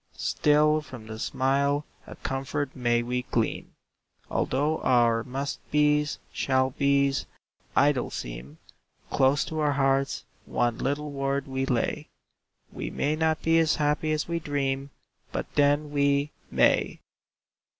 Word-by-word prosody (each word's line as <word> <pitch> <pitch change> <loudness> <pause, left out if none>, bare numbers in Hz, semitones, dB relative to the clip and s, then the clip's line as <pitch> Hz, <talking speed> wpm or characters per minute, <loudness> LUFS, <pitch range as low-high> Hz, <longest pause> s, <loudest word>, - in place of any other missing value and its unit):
Still 150 +1 +3
from 130 -6 -11
the 110 0 -8
smile 140 +4 +1 0.2
a - - -9
comfort 135 +1 -3
may 120 -2 +1
we 125 +1 -1
glean; 115 -2 -1 0.6
Although 150 +4 0
our 120 -2 +3
"must 135 +3 -4
be's," 150 0 +2 0.2
"shall 130 -1 +1
be's," 140 0 +1 0.5
idle 140 -2 +3
seem, - - -7 0.5
Close 135 +2 +3
to 160 - -4
our 150 -1 +2
hearts 135 0 +1 0.2
one 120 -1 0
little 145 +2 -2
word 140 0 -1
we 135 0 -2
lay: 125 -3 -1 0.6
We - - -4
may 150 +2 0
not 160 0 0
be 165 0 +4
as 160 -2 +3
happy 150 +1 0
as 155 0 -1
we 170 0 -1
dream, 140 -2 -2 0.4
But - - -4
then 145 +1 +2
we 140 0 +2 0.2
may. - - +2
140 Hz, 130 wpm, -27 LUFS, 130-150 Hz, 0.6 s, be